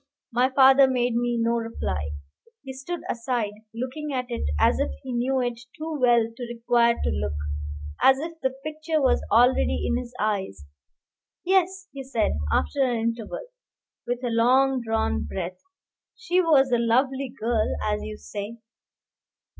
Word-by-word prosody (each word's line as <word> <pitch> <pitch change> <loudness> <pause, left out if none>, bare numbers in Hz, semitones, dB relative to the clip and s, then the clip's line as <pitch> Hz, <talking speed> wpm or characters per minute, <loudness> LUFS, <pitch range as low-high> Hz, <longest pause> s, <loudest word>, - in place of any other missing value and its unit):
My 250 +2 +3
father 270 0 +6
made 245 -2 +1
me 240 0 0
no 230 +1 +2
reply. 80 - -3 0.5
He 265 -1 -7
stood 300 +7 -5
aside, 230 -3 -2 0.2
looking 260 +6 -5
at 255 -2 -1
it 235 - -2
as - - +3
if - - +1
he 255 - -5
knew 255 +2 +1
it 245 -1 -2 0.2
too 315 0 -4
well 240 -2 +5
to 245 0 -6
require 235 0 +2
to - - +1
look, 70 0 -2 0.7
as 265 0 +6
if 325 +4 -5
the 265 - +2
picture 310 +4 -3
was 265 -3 +2
already 245 +4 +3
in 240 - +1
his 245 -1 -8
eyes. 195 - -2 0.8
"Yes," 380 +1 +1
he 275 -1 -7
said, 245 -4 0 0.2
after 275 - +1
an 245 -3 +1
interval, 230 - -3 0.6
with 245 +1 -2
a 245 - -1
long 255 +3 +3
drawn 220 - 0
breath, 175 - -5 0.6
"she 370 -6 +1
was 280 -6 +4
a 240 - +3
lovely 260 +3 +1
girl, 225 -1 0
as 210 0 0
you 215 0 -6
say." 210 +3 -7
245 Hz, 155 wpm, -25 LUFS, 230-270 Hz, 0.8 s, father